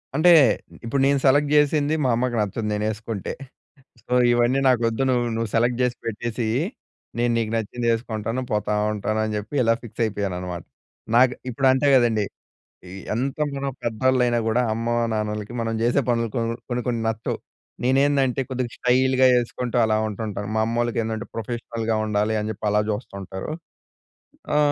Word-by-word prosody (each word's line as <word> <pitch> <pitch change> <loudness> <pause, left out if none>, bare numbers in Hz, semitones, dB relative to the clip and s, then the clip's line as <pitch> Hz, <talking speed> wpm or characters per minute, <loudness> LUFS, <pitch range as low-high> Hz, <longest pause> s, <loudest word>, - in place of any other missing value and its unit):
అంటే 175 +3 +6 0.5
ఇప్పుడు 135 +4 0
నేను 140 0 +3
సెలెక్ట్ 145 +2 +4
జేసింది 150 +1 +3
మా - - +3
అమ్మకి 120 0 -1
నచ్చదు 105 +2 -2
నేనేసుకుంటే. 110 0 -3 0.7
సో, - - -16 0.2
ఇవన్నీ 120 +3 +2
నాకొద్దు 120 0 +2
నువ్వు 120 -1 +2
నువ్వు 115 -1 -2
సెలెక్ట్ 120 +2 +2
జేసి 125 -1 0
పెట్టేసేయి. 115 +2 -2 0.6
నేను 120 0 +2
నీకు 110 -1 -1
నచ్చింది 115 +2 -3
ఏసుకుంటాను. 115 +1 -3
పోతా 105 0 0 0.2
ఉంటాను 110 +1 -2
అని 110 0 -2
జెప్పి 105 +7 -6
ఇలా 115 0 +4
ఫిక్స్ 115 0 -7
అయిపోయాను 100 -3 -2
అన్నమాట. 90 -2 -5 0.5
నాకు 125 +1 +5 0.2
ఇప్పుడు 135 +3 +1
అంతే 130 +2 +2
గదండీ! 115 -4 +3 0.6
ఈ - - -10 0.2
ఎంత 130 +4 -2 0.2
మనం 135 0 -2
పెద్దోళ్ళు 125 +3 +1
అయినా 120 -1 +1
కూడా 120 +3 +2
అమ్మ, 115 +1 -3 0.3
నాన్నలకి 105 0 -3
మనం 115 0 -2
జేసే 120 +4 +2
పనులు 115 -1 +1
కొన్ 115 -1 0 0.2
కొన్ని, 120 0 -2
కొన్ని 115 -2 -1
నచ్చవు. 110 0 -3 0.5
నేనేందంటే 135 0 +2
కొద్దిగా 125 -2 -3
స్టైల్‍గా 130 +1 +3
ఏసుకుంటూ 120 0 -3
అలా 110 0 +2
ఉంటుంటాను. 105 -1 -4
మా 110 - +2
అమ్మోళ్ళకేందంటే 115 -1 -1
ప్రొఫెషనల్‍గా 115 -1 -3
ఉండాలి 105 +1 0
అని 105 +1 -3
జెప్పి 110 +1 -7
అలా 105 0 +3
చూస్తుంటారు. 100 +3 -6 1.0
ఆ - - +4
115 Hz, 155 wpm, -23 LUFS, 110-125 Hz, 1.0 s, అంటే